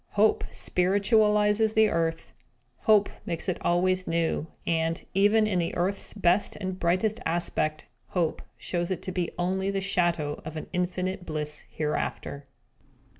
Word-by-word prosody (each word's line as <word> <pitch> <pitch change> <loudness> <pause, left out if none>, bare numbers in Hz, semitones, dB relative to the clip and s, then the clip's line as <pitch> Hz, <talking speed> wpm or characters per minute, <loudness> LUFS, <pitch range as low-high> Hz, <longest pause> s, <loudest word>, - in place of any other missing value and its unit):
Hope 210 +1 +3
spiritualises 210 +3 +2
the 220 -1 +5
earth; 165 -2 -1 0.5
Hope 210 -2 +6 0.2
makes 170 +1 -3
it 185 - -1
always 185 +1 +1
new; 165 -1 0 0.2
and, 165 0 0
even 205 +3 +4
in 195 -4 +1
the 170 - -2
earth's 190 +5 -2
best 190 0 +2
and 185 -2 -4
brightest 185 +6 +1
aspect, 160 -2 -1 0.2
Hope 170 -4 -1 0.2
shows 175 -1 -2
it 185 - -3
to 185 - -4
be 180 -2 -1
only 190 +2 0
the 200 0 0
shadow 170 -6 0
of 155 0 -7
an 155 - -5
infinite 185 +1 -1
bliss 150 -2 -5
hereafter! 150 -2 -3
180 Hz, 140 wpm, -27 LUFS, 165-200 Hz, 0.5 s, Hope